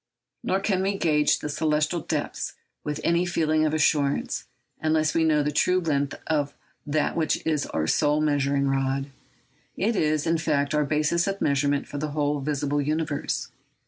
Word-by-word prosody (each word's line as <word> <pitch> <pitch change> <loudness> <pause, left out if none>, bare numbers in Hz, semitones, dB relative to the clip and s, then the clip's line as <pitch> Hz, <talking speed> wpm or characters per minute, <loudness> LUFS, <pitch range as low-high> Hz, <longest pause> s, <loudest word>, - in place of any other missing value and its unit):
Nor 190 - +1
can 195 -2 +1
we 195 +1 0
gauge 150 -4 +3
the - - -5
celestial 150 +2 0
depths - - -3 0.3
with 150 0 -3
any 170 +1 +2
feeling 155 -3 +1
of - - -1
assurance, 145 -2 +1 0.4
unless 155 -1 +2
we 165 - +2
know 155 -2 +3
the 150 - 0
true 180 +5 +2
length 145 -5 -1
of 145 -2 -1 0.3
that 150 +1 0
which 160 -2 0
is 155 -3 0
our 80 - -1
sole 150 - +2
measuring 140 -2 +1
rod. 135 0 -1 0.7
It 220 +4 +1
is, 155 -3 +1
in 165 0 +1
fact, 145 -3 0
our 150 -1 +2
basis 155 +4 +1
of 195 0 -2
measurement 140 0 +1
for 145 - -5
the 150 0 -3
whole 145 -1 0
visible 145 0 -1
universe. 155 0 -2
150 Hz, 170 wpm, -25 LUFS, 145-160 Hz, 0.7 s, gauge